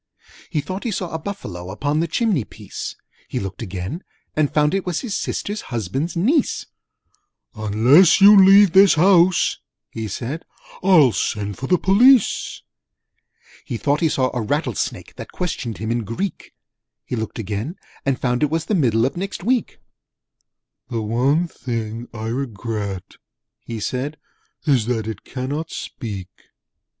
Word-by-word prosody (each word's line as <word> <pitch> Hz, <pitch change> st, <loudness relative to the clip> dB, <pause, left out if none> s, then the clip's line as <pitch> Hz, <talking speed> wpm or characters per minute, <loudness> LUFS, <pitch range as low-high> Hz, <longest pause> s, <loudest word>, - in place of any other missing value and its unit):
He 155 Hz, -4 st, -1 dB
thought 185 Hz, +6 st, -6 dB
he 240 Hz, -, -1 dB
saw 185 Hz, -4 st, -3 dB
a 160 Hz, -, -2 dB
Buffalo 100 Hz, -, -6 dB
Upon 145 Hz, +10 st, -1 dB
the 165 Hz, -, +1 dB
chimney 195 Hz, -, +1 dB
piece: -, -, -8 dB, 0.3 s
He -, -, -3 dB
looked 95 Hz, +2 st, -6 dB
again, 95 Hz, -, -5 dB, 0.3 s
and 155 Hz, -2 st, +1 dB
found 150 Hz, +1 st, +2 dB
it 195 Hz, -1 st, 0 dB
was 180 Hz, -2 st, -2 dB
His 220 Hz, -6 st, -3 dB
Sister's 205 Hz, +1 st, -3 dB
Husband's 125 Hz, -, -2 dB
Niece. 255 Hz, -, +1 dB, 0.9 s
'Unless 115 Hz, -, +5 dB
you 200 Hz, +1 st, +9 dB
leave 195 Hz, 0 st, +8 dB
this 195 Hz, +1 st, +6 dB
house,' 180 Hz, +1 st, +4 dB, 0.3 s
he 110 Hz, -1 st, -4 dB
said, 125 Hz, -, -5 dB, 0.4 s
"I'll 175 Hz, -9 st, +6 dB
send 100 Hz, +1 st, -2 dB
for 135 Hz, -, -4 dB
the 180 Hz, -, +4 dB
Police!' 230 Hz, +6 st, +4 dB, 1.0 s
He 120 Hz, -, -4 dB
thought 145 Hz, +5 st, +1 dB
he 165 Hz, -, +2 dB
saw 130 Hz, -3 st, +1 dB
a 120 Hz, -, 0 dB
Rattlesnake 130 Hz, -, -2 dB
That -, -, -8 dB
questioned 125 Hz, -, -4 dB
him 110 Hz, +4 st, -3 dB
in 120 Hz, 0 st, -1 dB
Greek: 115 Hz, -, -5 dB, 0.5 s
He -, -, -3 dB
looked 110 Hz, -1 st, -4 dB
again, 110 Hz, -, -4 dB, 0.3 s
and 135 Hz, -2 st, 0 dB
found 125 Hz, 0 st, 0 dB
it 150 Hz, -, +3 dB
was 160 Hz, +1 st, -1 dB
The -, -, -1 dB
Middle 120 Hz, -, +3 dB
of 135 Hz, -, -2 dB
Next 190 Hz, 0 st, -5 dB
Week. 245 Hz, +3 st, 0 dB, 1.1 s
'The 115 Hz, -, -2 dB
one 130 Hz, +10 st, +1 dB
thing 115 Hz, -5 st, -5 dB
I 110 Hz, -1 st, -6 dB
regret,' 110 Hz, -6 st, -4 dB, 0.5 s
he 115 Hz, -1 st, -6 dB
said, 130 Hz, +7 st, -3 dB, 0.5 s
'Is 130 Hz, -8 st, +2 dB
that 115 Hz, -3 st, -1 dB
it 110 Hz, -3 st, -6 dB
cannot 140 Hz, +5 st, -4 dB
speak!' 100 Hz, -10 st, -6 dB
135 Hz, 150 wpm, -21 LUFS, 110-180 Hz, 1.1 s, you